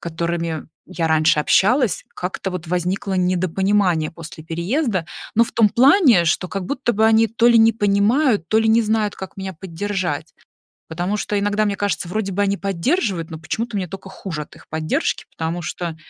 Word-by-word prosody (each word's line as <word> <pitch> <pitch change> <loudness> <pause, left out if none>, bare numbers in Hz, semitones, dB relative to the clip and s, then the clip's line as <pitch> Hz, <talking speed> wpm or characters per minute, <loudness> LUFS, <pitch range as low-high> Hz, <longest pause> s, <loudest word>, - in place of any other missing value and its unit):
которыми 170 -1 -3 0.2
я 175 -3 -3
раньше 155 -1 +3
общалась, 215 - +2
как-то 185 +1 -4
вот 180 -2 -6
возникло 180 +3 -2
недопонимание 185 -1 +1
после 165 -1 -10
переезда. 185 - -1 0.3
Но 230 - +6
в - - -10
том 225 -2 +4
плане, 255 - +5
что 175 +2 0
как 195 -2 -4
будто 270 -4 -1
бы 220 +2 +3
они 225 0 +4
то 230 +2 +2
ли 235 -1 +6
не 225 0 +6
понимают, 205 - +2
то 220 - +3
ли 220 0 +2
не 230 +1 +4
знают, 215 -1 0
как 190 0 -9
меня 190 0 -5
поддержать. 185 -2 -4 0.6
Потому 175 +5 -2
что 210 0 -2
иногда 205 +1 +1
мне 200 - 0
кажется, 200 -4 -2
вроде 200 0 -2
бы 200 +2 -1
они 200 0 +1
поддерживают, 195 - -1
но 160 - -7
почему-то 225 +8 -4
мне 185 -2 -2
только 195 +2 -9
хуже 175 -5 -6
от - - -11
их - - -18
поддержки. 155 0 -1
Потому 165 +2 -3
что, 170 -1 -5
195 Hz, 185 wpm, -20 LUFS, 170-220 Hz, 0.6 s, Но